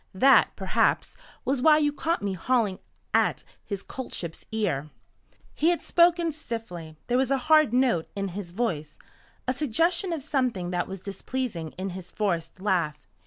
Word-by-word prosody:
That, 270 +8 +5
perhaps, - - +1 0.3
was 260 0 +1
why 305 +2 +7
you 295 -1 +2
caught 330 -1 -1
me 200 -1 -1
hauling 210 0 +1 0.3
at - - +2 0.2
His 200 -2 -5
Coltship's 180 -10 -5
ear." 155 -10 -1 0.6
He 320 - +2
had 345 - 0
spoken 340 -1 +4
stiffly. 200 - -7
There 245 +1 +2
was 265 -1 +1
a 275 - +3
hard 310 0 +4
note 245 -10 +2
in 200 -1 -2
his 185 0 -6
voice, 175 -8 -2 0.5
a 255 - +2
suggestion 330 - +1
of 320 -5 -3
something 250 -11 -1
that 175 -1 -1
was 195 -1 -7
displeasing 200 -3 -4
in 190 +1 -3
his 180 0 -8
forced 175 -5 -2
laugh. 175 -6 +1
225 Hz, 160 wpm, -27 LUFS, 180-275 Hz, 0.6 s, why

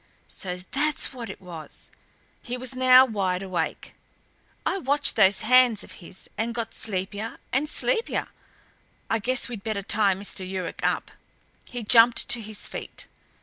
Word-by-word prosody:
"So 180 -2 -4
that's 295 0 +1
what 240 -3 -7
it - - -8
was." 170 -4 -10 0.5
He 245 +1 -5
was 255 +1 -3
now 255 0 +7
wide 195 -5 -2
awake. 185 -2 -4 0.7
"I 390 - 0
watched 285 -1 +1
those 195 -2 +4
hands 245 -1 +5
of - - -13
his 185 +2 -12
and 230 +1 -1
got 230 -1 -4
sleepier 205 +2 -4 0.2
and 285 +4 +1
sleepier 470 +5 0 0.8
I 225 - +2
guess 255 +4 +1
we'd 230 -5 -7
better 215 -3 -3
tie 200 -1 +3
Mr. 195 0 -3
Yuruk 185 0 -5
up." - - -1 0.5
He 245 -1 -7
jumped 230 +2 +5
to 240 - +4
his 215 -1 -4
feet. - - -7
225 Hz, 150 wpm, -25 LUFS, 195-255 Hz, 0.8 s, now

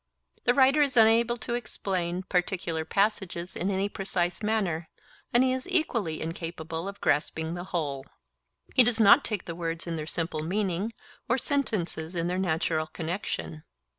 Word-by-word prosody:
The 245 - +4
writer 275 +2 +5
is 275 -4 +1
unable 230 +2 +5
to 235 +1 -4
explain 185 -6 -2
particular 180 -3 -1
passages 190 -1 -1
in 185 - -1
any 195 0 +1
precise 185 -3 -2
manner, 195 -7 0 0.4
and 240 +2 +5
he 260 0 +2
is 260 +7 -4
equally 235 - 0
incapable 165 +1 -5
of 200 0 -7
grasping 160 +2 0
the 175 +1 -5
whole. 145 -7 -3 0.7
He 255 - +8
does 240 -1 +1
not 220 +6 +7
take 210 -4 -3
words 165 -1 -3
in 170 -1 -3
their 155 -1 -5
simple 165 -2 -1
meaning 190 +4 -1 0.4
or 240 - +3
sentences 190 - -1
in 170 -1 0
their 180 +1 -1
natural 160 -3 0
connexion. 120 - -4
180 Hz, 155 wpm, -28 LUFS, 165-220 Hz, 0.7 s, He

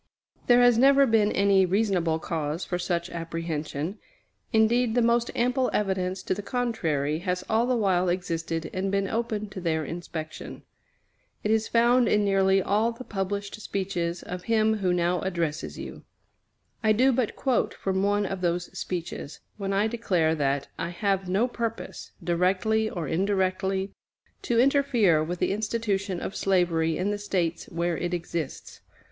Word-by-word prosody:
There 245 0 +6
has 245 -2 +5
never 275 +1 +6
been 220 -4 +3
any 195 -1 +4
reasonable 185 -4 +1
cause 160 0 -3
for 180 - -2
such 170 -1 -2
apprehension. 165 +1 -4 0.5
Indeed, 225 +1 +3
the 245 - +4
most 235 0 +2
ample 250 +2 +1
evidence 190 -2 -1
to - - 0
the 200 - -4
contrary 165 - -1
has 180 0 -2
all 225 +2 +2
the 255 - +2
while 185 -5 +2
existed 165 -2 -2
and 190 +1 -1
been 195 0 +1
open 220 -1 -2
to 190 - -7
their 160 -2 0
inspection. 160 -1 -7 0.8
It 210 - +1
is 220 0 +2
found 240 +1 +4
in 210 -1 +3
nearly 195 -1 +3
all 215 +4 +2
the 235 +2 -9
published 200 0 -4
speeches 180 -4 -3
of 180 0 -7
him 220 -1 +2
who 190 -3 0
now 175 0 +1
addresses 170 -4 -2
you. - - -8 0.8
I 215 -2 +4
do 255 +5 +4
but 245 -3 0
quote 260 -3 0
from 190 -1 -1
one 205 +1 +2
of 195 -1 -4
those 175 0 -1
speeches, 170 -4 -5 0.2
when 195 -2 -3
I 200 +2 +2
declare 195 -8 +1
that 140 -2 0
"I - - -2
have 190 +1 -1
no 200 +7 +2
purpose, 230 -2 -5
directly 185 +5 +1
or 170 -7 -4
indirectly, 190 +2 0 0.5
to 235 -1 +1
interfere 245 - +3
with 175 +3 -3
the - - 0
institution 205 -3 -1
of 195 - -5
slavery 170 -4 +1
in 195 +3 0
the 205 - -3
States 180 -5 -1
where 170 0 -2
it 175 0 -1
exists." 165 -4 -5
195 Hz, 160 wpm, -26 LUFS, 175-220 Hz, 0.8 s, There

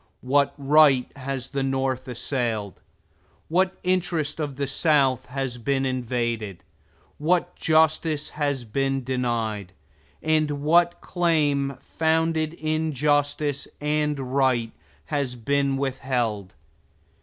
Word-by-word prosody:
What 140 +2 +2
right 140 -2 +4
has 135 -1 -4
the 140 -1 -2
North 135 -1 -1
assailed? 120 - -2 0.7
What 185 +3 +2
interest 170 -5 0
of 145 -3 -3
the 140 +1 -1
South 140 -3 +2
has 130 -2 -4
been 135 +2 0
invaded? 120 -6 -2 0.6
What 170 +4 +1
justice 155 -1 +2
has 145 -4 -2
been 135 +3 -1
denied? 115 -6 -2 0.5
And 155 -2 +1
what 170 +3 +3
claim 145 -6 +1
founded 160 0 0
in 155 0 -1
justice 145 0 +1
and 150 -3 -1
right 130 -4 +2 0.3
has 140 -4 -2
been 140 +3 0
withheld? 125 - -2
140 Hz, 105 wpm, -24 LUFS, 125-155 Hz, 0.7 s, right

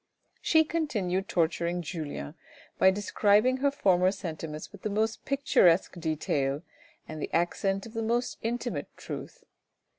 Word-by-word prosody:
She 320 -1 +5
continued 210 - -1
torturing 170 +1 0
Julien 150 - -5 0.5
by 190 - +7
describing 205 +5 +3
her 280 +2 +2
former 185 -10 +3
sentiments 160 -5 -6
with 200 - -13
the 215 - -2
most 220 +2 -1
picturesque 190 -11 +3
detail 150 -3 -1 0.4
and 155 -1 -7
the - - -4
accent 195 +3 0
of 225 - -11
the 225 - -2
most 235 +2 -1
intimate 240 +1 -2
truth. - - -8
195 Hz, 130 wpm, -29 LUFS, 170-230 Hz, 0.5 s, by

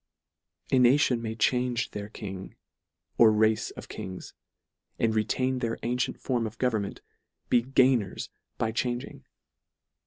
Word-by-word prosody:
A 130 - +5
nation 125 -1 +4
may 110 -1 -4
change 125 +2 +1
their 105 0 -6
King 95 -3 -8 0.6
or 115 -2 +8
race 110 0 +2
of - - -10
Kings, 95 -1 -7 0.6
and 115 -1 +1
re 110 -1 +2
tain 130 +4 0
their 115 -2 -2
antient 125 +1 -1
form 120 -4 -1
of 110 +1 -10
government, 110 -6 -1 0.5
be 120 - +5
gainers 125 -5 +2 0.3
by 110 - 0
changing. 120 +1 -3
115 Hz, 130 wpm, -28 LUFS, 110-125 Hz, 0.6 s, or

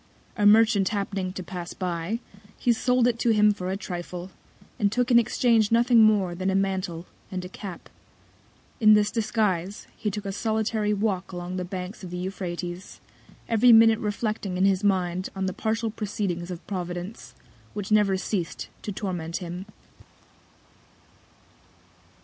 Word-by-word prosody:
A 210 -2 +3
Merchant 215 -2 +5
happening 195 -3 -2
to 185 - -6
pass 175 -1 -7
by, 180 +4 -2 0.4
he 240 - +2
sold 250 +1 +2
it 235 -1 0
to 235 - +2
him 210 -1 +5
for 185 -2 -5
a 190 - -1
Trifle, 180 -1 -6 0.5
and 205 -3 +2
took 245 +3 0
in 235 - +8
Exchange 230 -2 +2
nothing 235 0 +5
more 205 -5 +4
than 185 +2 -2
a 190 - +1
Mantle, 190 -3 -1 0.3
and 185 -1 -4
a - - -7
Cap. 190 -2 -8 0.9
In 215 -2 +7
this 210 0 +2
Disguise, 210 -4 -1
he 210 - -2
took 210 +1 -5
a 195 - -2
solitary 215 0 0
Walk 200 -3 -1
along 180 0 -5
the 180 - -2
Banks 185 +2 -6
of 180 - -6
the 180 - -5
Euphrates, 180 -1 -5 0.5
every 235 +2 +5
Minute 225 -1 +7
reflecting 210 -3 -2
in 185 - +3
his 195 0 +2
Mind 185 -2 +1
on 190 0 -2
the 185 - -2
partial 225 +2 -1
Proceedings 195 -5 -3
of 175 -2 -7
Providence, 180 +1 -6 0.4
which 205 0 -5
never 205 -3 +4
ceas'd 185 -2 -3
to 210 - -4
torment 180 -4 -3
him. 180 +1 -6
195 Hz, 155 wpm, -26 LUFS, 180-215 Hz, 0.9 s, in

